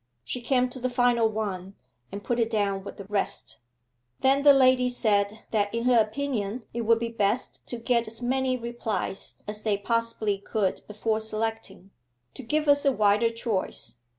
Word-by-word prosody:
She 250 - -4
came 255 +1 +2
to 260 - -9
the 255 +1 -1
final 245 -2 +3
one, 200 -3 -4 0.4
and 200 +1 -6
put 240 0 -1
it 225 -1 +2
down 200 -3 0
with - - -9
the 200 - -8
rest. 200 0 -3 0.6
Then 270 +1 +4
the 290 0 +8
lady 255 -2 +4
said 210 -3 +1
that 205 -2 +1
in 230 - -1
her 245 -2 +5
opinion 225 -1 -2
it 235 - -2
would 230 0 +5
be 230 0 -3
best 230 +2 -1
to 240 - -4
get 235 0 0
as 225 +1 -6
many 255 +1 0
replies 235 -4 -3
as 210 0 -4
they 210 -2 +1
possibly 220 -1 -1
could 200 -1 -1
before 215 +1 -1
selecting 220 -3 -3 0.4
'to - - -9
give 300 +5 -1
us 285 0 +4
a 275 - +4
wider 210 -1 +3
choice. 230 - -3
225 Hz, 180 wpm, -26 LUFS, 205-245 Hz, 0.6 s, the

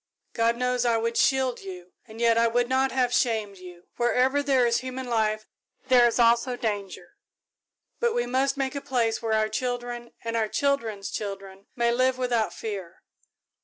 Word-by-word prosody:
God 230 +1 +1
knows 250 0 0
I 235 -2 +2
would 230 +1 -1
shield 260 -2 +2
you, 180 -2 -10
and 220 0 -12
yet 230 -1 +4
I 230 0 +4
would 240 +1 +1
not 260 +1 +1
have 250 -2 +1
you - - +3
shamed. 215 -5 -1 0.4
Wherever 255 +4 +2
there 270 -3 +3
is 235 0 +2
human 260 +1 -6
life, 215 -2 0 0.4
there 245 -2 +6
is 235 - -1
also 235 +1 +3
danger, 210 - -5 0.8
but 475 -1 +1
we 240 - +1
must 265 +3 0
make 270 -1 -1
a 280 - -4
place 230 -5 0
where 225 -1 -1
our 215 0 +2
children 240 +1 -4
and 230 0 -3
our 220 -1 +1
children's 230 -6 -1
children 195 -1 -6
may 235 -2 +2
live 255 +1 +2
without 245 -3 0
fear. 195 -6 -7
235 Hz, 175 wpm, -26 LUFS, 220-255 Hz, 0.8 s, there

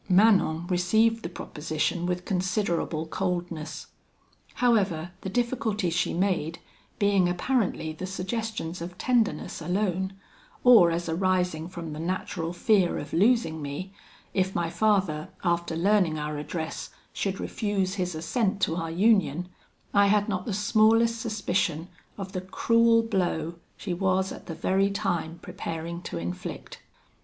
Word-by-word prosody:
"Manon 185 -4 +4
received 220 +6 +2
the 170 - -5
proposition 165 +1 -2
with 180 0 -2
considerable 180 -4 -1
coldness. 165 -3 -3 0.7
However, 195 -9 +2
the 190 - -4
difficulties 220 -5 0
she 180 - +1
made, 170 -3 0 0.4
being 200 -4 +3
apparently 180 -4 0
the 185 +4 -6
suggestions 190 -2 -3
of 175 +1 -7
tenderness 225 -11 0
alone, 190 +2 -1 0.5
or 230 -9 +8
as 170 +1 -2
arising 180 -1 0
from 170 -3 -6
the 150 - -6
natural 165 -1 -2
fear 185 +1 +2
of 145 - -7
losing 200 -5 +3
me, 145 +7 -5 0.4
if 190 0 0
my 170 -1 0
father, 190 -8 +1
after 170 -2 0
learning 180 -2 +3
our 150 0 -3
address, 160 +2 -4 0.2
should 195 -1 -2
refuse 200 -4 -1
his 180 -4 -2
assent 195 +5 0
to 165 -3 +1
our 165 -2 -2
union, 180 -3 +2 0.4
I 200 0 +5
had 205 0 +3
not 185 -3 -2
the - - -1
smallest 225 +2 +3
suspicion 185 -7 -1 0.3
of 195 -2 -6
the 185 -2 -3
cruel 230 +4 +3
blow 175 -6 -1 0.2
she 185 - -3
was 190 +1 +1
at - - -9
the 165 - -5
very 190 +4 +2
time 175 -5 -2
preparing 165 +1 -5
to - - -4
inflict. 85 +2 -6
185 Hz, 135 wpm, -27 LUFS, 165-205 Hz, 0.7 s, or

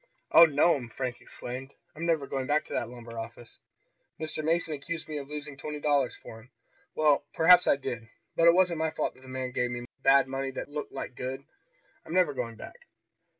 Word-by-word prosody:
"Oh, 170 - +10
no'm!" 145 -4 +2
Frank 125 -1 -4
exclaimed. 130 +3 -8 0.2
"I'm 165 +2 -3
never 160 -4 +2
going 135 -1 -3
back 150 +1 +2
to - - -8
that 115 - -1
lumber 120 -1 -9
office. 115 +1 -9 0.6
Mr. 155 0 -3
Mason 165 0 +1
accused 160 +3 -5
me 155 -1 -4
of 140 0 -9
losing 150 -1 -6
twenty 150 +1 -5
dollars 145 -4 +1
for 110 - -11
him. 115 +3 -18 0.5
Well 150 -2 +3
perhaps 180 +2 +7
I - - +6
did, 120 -5 -6 0.3
but 165 - +5
it 170 - +7
wasn't 180 -3 +3
my 160 0 +1
fault 155 - -2
that - - -20
the 130 - -15
man 130 0 -4
gave 125 -1 0
me 120 0 -5 0.2
bad 135 0 +5
money 135 0 -3
that - - -5
looked 150 0 -5
like - - -6
good. 130 +2 -5 0.6
I'm 165 - -6
never 180 -5 +4
going 120 -3 -4
back!" 485 - -11
140 Hz, 205 wpm, -29 LUFS, 125-155 Hz, 0.6 s, Oh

